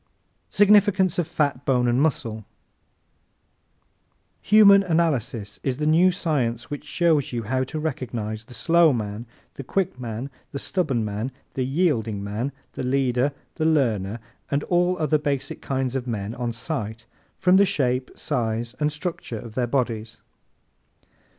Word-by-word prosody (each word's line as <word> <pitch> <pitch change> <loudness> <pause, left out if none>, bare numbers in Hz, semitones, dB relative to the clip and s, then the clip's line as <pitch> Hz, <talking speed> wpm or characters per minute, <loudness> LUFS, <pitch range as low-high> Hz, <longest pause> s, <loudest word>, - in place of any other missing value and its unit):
Significance 200 -3 +4
of 170 - 0
Fat, 140 -3 -1
Bone 125 -3 +2
and 120 +2 +2
Muscle 120 -7 0 2.1
¶ - - -29
Human 200 -1 +8
Analysis 145 - -1
is 130 -2 -1
the 150 - -1
new 170 +4 +5
science 130 -10 -1
which 145 0 -5
shows 160 -3 +1
you 120 -2 -3
how 130 +4 0
to 145 - -6
recognize 115 -7 -4
the 125 - -12
slow 170 0 +4
man, 110 0 -4 0.3
the 140 - -8
quick 175 -1 -1
man, 120 +3 -5 0.2
the - - -2
stubborn 140 - -1
man, 105 +5 -3 0.2
the 130 - -1
yielding 125 - 0
man, 110 +7 -3 0.2
the - - -5
leader, 130 +1 +1 0.3
the 155 - 0
learner, 115 -9 +1 0.3
and 145 +1 0
all 180 +1 +2
other 155 -1 +1
basic 145 -3 -3
kinds 130 -1 -2
of 130 -1 -3
men 105 -2 -3
on 120 -1 -3
sight 110 -1 -4 0.3
from 180 +1 +4
the 200 - +7
shape, 130 -8 0
size 115 0 -2
and 150 0 +1
structure 150 -6 -5
of 110 0 -9
their 125 0 0
bodies. 115 -4 -2
130 Hz, 150 wpm, -24 LUFS, 115-160 Hz, 2.1 s, Human